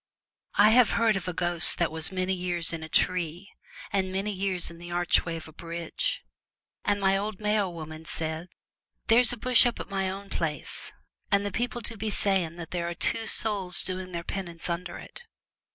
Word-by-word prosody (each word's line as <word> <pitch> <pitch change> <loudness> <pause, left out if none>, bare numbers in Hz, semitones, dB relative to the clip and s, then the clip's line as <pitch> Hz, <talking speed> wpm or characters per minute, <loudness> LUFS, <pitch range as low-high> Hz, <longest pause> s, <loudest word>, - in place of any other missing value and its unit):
I 205 +1 +7
have 240 -1 +5
heard 225 -2 +3
of 190 -1 -3
a - - 0
ghost 175 -1 +3
that 170 -2 +1
was 160 +3 -1
many 185 0 0
years 175 -2 0
in 165 - -4
a 160 - -7
tree 175 +2 0 0.4
and 190 -1 +1
many 195 +2 -1
years 190 -3 -2
in 170 - -12
the 175 0 -9
archway 175 -1 +2
of 160 -1 -7
a 155 - -13
bridge, 170 0 -3 0.6
and 205 - +1
my 195 0 +3
old 205 0 -2
Mayo 210 -2 +1
woman 160 -1 -8
says, 160 +2 -4 0.3
' - - -51
There 225 +2 +7
is 245 -1 +5
a 245 - -4
bush 250 +2 +6
up 240 - -2
at - - -6
my 195 -1 0
own 195 +1 -7
place, 150 -4 -3 0.4
and 200 0 +3
the 205 - -2
people 240 +3 -2
do 225 0 -5
be 215 +2 -2
saying 190 -5 +1
that 170 -2 -8
there 170 -1 -1
are 170 - -5
two 225 +5 0
souls 195 -5 +1
doing 185 0 -4
their 170 -1 -4
penance 175 -2 -5
under 175 +1 -4
it. - - -11
185 Hz, 205 wpm, -28 LUFS, 170-200 Hz, 0.6 s, I